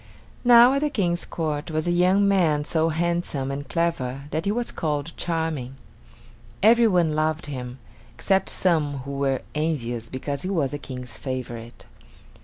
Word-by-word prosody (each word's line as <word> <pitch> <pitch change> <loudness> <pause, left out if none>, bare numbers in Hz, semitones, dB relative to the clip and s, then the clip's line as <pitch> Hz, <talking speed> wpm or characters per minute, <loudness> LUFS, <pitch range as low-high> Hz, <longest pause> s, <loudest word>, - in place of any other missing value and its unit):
Now 240 +1 +8
at 275 - +1
the 300 - +1
King's 180 -9 0
court 155 -1 -3
was 155 0 -1
a 175 - +1
young 185 +3 +3
man 165 -7 +2
so 160 +1 +1
handsome 165 -4 -1
and 140 0 -6
clever 150 -6 -1
that 160 +5 -2
he 200 - +1
was 240 +2 -2
called 150 0 -3
Charming. 160 -6 -2 0.9
Every 230 +2 +6
one 175 -6 +2
loved 155 +1 0
him, 125 -3 -6 0.3
except 195 -1 0
some 155 -6 +1
who 140 - -5
were 140 -2 -1
envious 120 -7 -2
because 140 +2 -4
he 185 - -3
was 155 -9 0
the 145 - -4
King's 125 -3 -8
favorite. 120 -3 -6
155 Hz, 160 wpm, -24 LUFS, 140-175 Hz, 0.9 s, Now